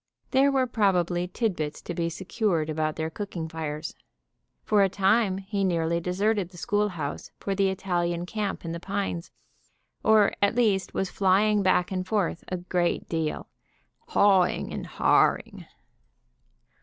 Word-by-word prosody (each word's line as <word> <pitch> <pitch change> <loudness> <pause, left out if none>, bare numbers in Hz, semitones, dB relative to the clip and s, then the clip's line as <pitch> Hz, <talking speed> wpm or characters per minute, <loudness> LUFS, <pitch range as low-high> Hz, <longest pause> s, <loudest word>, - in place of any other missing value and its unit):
There 275 +1 +4
were 265 -1 +2
probably 180 -6 +1
titbits 175 -8 -2
to 175 - -5
be 170 0 -1
secured 175 -2 -1
about 155 0 -1
their 160 0 -3
cooking 180 -4 -5
fires. 155 -1 -5 0.7
For 210 -1 +3
a 195 - +4
time 195 +1 +2
he 195 +1 -3
nearly 170 -2 +1
deserted 190 +2 0
the 180 - -15
schoolhouse 190 -7 -2
for 195 - -2
the 195 0 +2
Italian 175 -2 -1
camp 205 -1 -3
in 165 - -3
the 170 - -4
pines, 190 -2 -3 0.7
or 215 -2 +5
at 200 +2 +3
least 210 -6 +1
was 190 - -1
flying 205 +2 +3
back 185 -1 +2
and 185 -1 -3
forth 195 -5 -1
a 185 - -3
great 175 0 -1
deal, 160 -2 -2 0.6
"hawing" 195 -3 +3
and - - -5
"harring." - - +1
185 Hz, 145 wpm, -26 LUFS, 170-205 Hz, 0.7 s, or